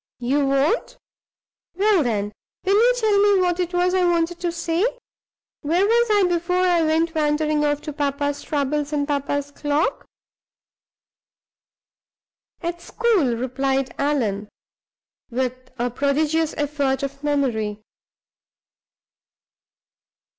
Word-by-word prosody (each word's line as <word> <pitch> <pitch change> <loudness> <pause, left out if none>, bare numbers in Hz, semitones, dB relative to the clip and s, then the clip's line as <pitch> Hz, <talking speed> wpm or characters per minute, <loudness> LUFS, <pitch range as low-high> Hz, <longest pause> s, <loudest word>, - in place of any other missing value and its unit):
You 275 +3 0
won't? 275 - +1 0.8
Well, 400 -1 +3
then, 210 -6 -1 0.3
will 390 - +3
you 470 +5 +5
tell 430 -4 +3
me 405 -1 +4
what 360 -1 +1
it 355 -1 -1
was 360 0 +1
I 370 -1 +2
wanted 345 0 +1
to 350 -1 -1
say? 335 +1 -1 0.8
Where 340 +6 +2
was 470 +2 +3
I 415 -2 +4
before 350 0 -1
I 360 -2 +3
went 325 +1 +1
wandering 300 -1 +1
off 290 0 0
to 300 - -6
papa's 285 0 -2
troubles 295 0 -1
and 285 -1 0
papa's 285 0 -2
clock?" 290 +1 -1 2.5
"At 345 0 -4
school!" 365 - +1
replied 265 +2 -1
Allan, 220 -8 -1 0.8
with 255 +1 -3
a 245 +1 -1
prodigious 300 +4 0
effort 285 -2 -1
of 275 +1 -5
memory. 225 -8 -1
295 Hz, 115 wpm, -22 LUFS, 275-350 Hz, 2.5 s, you